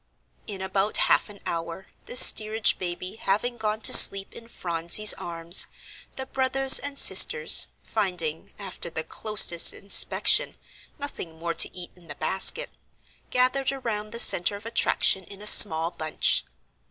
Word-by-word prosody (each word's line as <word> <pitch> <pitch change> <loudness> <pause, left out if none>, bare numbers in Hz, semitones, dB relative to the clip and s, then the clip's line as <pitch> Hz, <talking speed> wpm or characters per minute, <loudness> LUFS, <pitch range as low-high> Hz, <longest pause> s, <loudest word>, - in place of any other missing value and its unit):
In 195 -3 -9
about 195 +2 -5
half - - -1
an 205 -1 -16
hour, 165 +3 -8 0.2
the - - -10
steerage 220 -3 +3
baby 185 +2 -8
having 225 +5 -5
gone 215 0 -6
to - - +4
sleep 195 0 +6
in 230 - -14
Phronsie's 170 +1 +1
arms, 170 +1 +1 0.5
the 265 - -9
brothers 265 0 +2
and 285 0 -9
sisters, 475 +10 +3 0.2
finding, 180 -7 -6
after 190 -4 -9
the 160 -1 -7
closest 210 -5 +2
inspection, 200 - +1 0.4
nothing 280 - -10
more 170 +1 -7
to 165 - +1
eat 175 -1 -11
in 175 -2 -24
the 145 - -10
basket, 190 - -2 0.6
gathered 255 +2 -2
around 225 -6 -8
the 230 - -9
centre 200 -4 +3
of 205 +2 -15
attraction 225 -4 -1
in 200 +2 -16
a 210 - -12
small 165 -5 +5
bunch. 155 -2 -3
200 Hz, 145 wpm, -22 LUFS, 170-230 Hz, 0.6 s, sleep